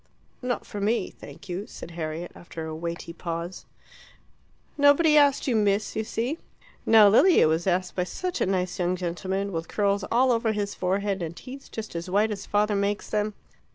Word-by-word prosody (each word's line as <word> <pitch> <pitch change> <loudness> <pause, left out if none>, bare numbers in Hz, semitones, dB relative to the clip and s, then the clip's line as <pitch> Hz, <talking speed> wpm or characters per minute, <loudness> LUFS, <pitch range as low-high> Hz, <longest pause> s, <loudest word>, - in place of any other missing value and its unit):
"Not 250 -1 -2
for 205 - -6
me, 210 -1 0
thank - - -13
you," 190 +4 -4
said 170 - -9
Harriet, 165 +1 -5
after 165 -2 -8
a 160 0 -5
weighty 170 +1 -5
pause. 170 +1 -5 1.1
"Nobody 290 +2 +5
asked 285 -2 +4
you, 250 - +2
Miss, 205 -1 +1
you 220 - 0
see. 245 +9 -2 0.5
Now 220 -2 +8
Lilia 275 - +6
was 160 +3 0
asked 185 0 0
by 180 - 0
such 360 - -4
a - - +2
nice 185 -1 -1
young 180 0 +1
gentleman, 185 +3 -3
with 165 -1 -3
curls 200 -1 0
all 255 +2 +4
over 230 -2 +1
his 205 -1 -2
forehead, 195 +1 -1
and 170 0 -4
teeth 270 +1 -10
just 220 -5 -6
as 170 +2 -4
white 210 +4 +2
as 205 -1 -5
father 210 0 +2
makes 200 +1 -1
them." 210 -1 0
200 Hz, 185 wpm, -26 LUFS, 175-225 Hz, 1.1 s, Now